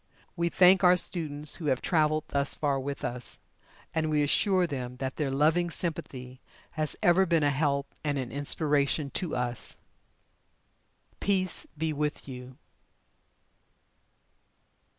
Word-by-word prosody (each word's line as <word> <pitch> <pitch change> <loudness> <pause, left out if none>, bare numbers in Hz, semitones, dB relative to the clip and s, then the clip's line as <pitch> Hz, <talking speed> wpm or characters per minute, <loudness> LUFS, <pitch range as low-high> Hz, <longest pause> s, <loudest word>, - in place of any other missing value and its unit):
We 170 -1 0
thank 185 +2 +5
our 180 0 +6
students 150 -5 -1
who 165 - -7
have 130 -3 +2
traveled 155 -2 +1
thus 140 -1 0
far 140 -2 0
with 140 +1 -4
us, 120 0 -5 0.5
and 160 -1 0
we 150 -1 +2
assure 185 +5 +2
them 125 -5 -5
that 130 0 -4
their 150 -3 -1
loving 155 +6 +2
sympathy 130 -7 -4 0.3
has 155 -3 -3
ever 185 +2 +4
been 165 -2 +2
a 145 - +3
help 140 -1 -1
and 145 -2 -1
an 130 -3 -4
inspiration 145 0 +1
to 180 -5 -2
us. 125 -1 -4 1.4
Peace 185 -3 0
be 160 0 -1
with 150 0 -3
you. 125 -1 -9
150 Hz, 130 wpm, -28 LUFS, 135-170 Hz, 1.4 s, our